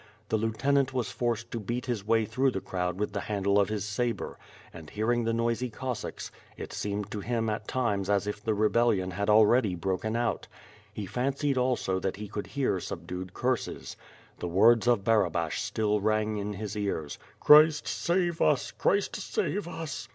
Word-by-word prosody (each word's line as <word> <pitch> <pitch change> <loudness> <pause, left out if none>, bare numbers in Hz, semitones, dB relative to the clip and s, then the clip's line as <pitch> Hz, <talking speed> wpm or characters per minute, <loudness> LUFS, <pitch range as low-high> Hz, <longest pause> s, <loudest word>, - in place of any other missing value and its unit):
The 110 - +2
lieutenant 130 +5 +1
was 120 -6 -1
forced 115 0 -2
to 115 - -3
beat 120 +4 -3
his 120 -6 -2
way 110 +1 +2
through 130 +6 +1
the 115 - -2
crowd 90 -1 -3
with 105 0 -1
the 100 - -1
handle 100 -1 +1
of 100 - +2
his 105 -2 -2
sabre, 115 +3 -2 0.3
and 80 -3 -10
hearing 115 +2 0
the 115 - +1
noisy 115 +2 0
Cossacks, 125 0 -5 0.3
it - - -7
seemed 105 0 -3
to 105 - -3
him 115 +1 -1
at 105 0 -4
times 105 -7 -1
as 100 -1 +2
if 105 0 -5
the 110 -1 0
rebellion 105 -3 +2
had 100 +3 -2
already 110 -1 +5
broken 95 +5 -2
out. 120 -1 -1 0.4
He 105 -1 -5
fan 125 +8 -1
cied 140 0 0
also 125 -7 0
that 95 0 -2
he 105 +1 -7
could 105 0 -5
hear 130 -7 0
subdued 90 +1 -6
curses. 130 -1 -2 0.4
The - - -3
words 110 +7 +4
of 120 -5 +3
Barabash 90 -8 +1
still 105 -1 0
rang 110 0 +1
in 105 0 -3
his 105 0 -5
ears: 95 -8 -3 0.2
"Christ 150 +1 +7
save 175 -1 0
us! - - +2
Christ - - 0
save 210 - -2
us!" 165 -3 -6
110 Hz, 180 wpm, -28 LUFS, 100-120 Hz, 0.4 s, Christ